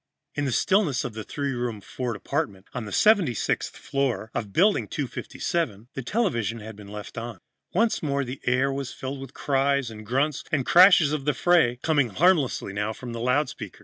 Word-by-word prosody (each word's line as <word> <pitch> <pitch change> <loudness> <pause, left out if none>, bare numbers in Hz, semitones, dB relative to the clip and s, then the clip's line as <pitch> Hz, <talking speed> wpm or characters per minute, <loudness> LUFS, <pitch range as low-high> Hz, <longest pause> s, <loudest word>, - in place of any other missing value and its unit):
In 145 - -2
the 135 - -1
stillness 175 - +2
of 120 - -5
the 110 0 -6
three 140 +4 -3
room 120 -4 -3
Ford 120 +4 -4
apartment 100 -4 -3
on 115 - -4
the 105 - -7
76th 195 - +2
floor 135 -5 -2
of 105 -3 -3
Building 195 - +3
257, 130 - -3
the 135 - -4
television 120 - -1
set 105 - -10
had 110 -1 -8
been 105 -1 -12
left 105 +2 -7
on. 115 0 -6 0.3
Once 220 +5 +1
more 140 -2 0
the 130 +1 -7
air 130 +2 +2
was 135 -2 -4
filled 135 +1 -6
with 135 - -7
the - - -23
cries 140 -2 +1
and 110 -1 -9
grunts 135 +6 0
and 140 -5 +1
crashes 180 -4 +7
of 145 -3 -3
the 150 - +1
fray, 165 -9 +3
coming 145 -6 +2
harmlessly 145 - +2
now 105 +2 -2
from 120 +1 -8
the 115 - -5
loudspeaker. 125 +1 -1
135 Hz, 195 wpm, -25 LUFS, 115-150 Hz, 0.3 s, crashes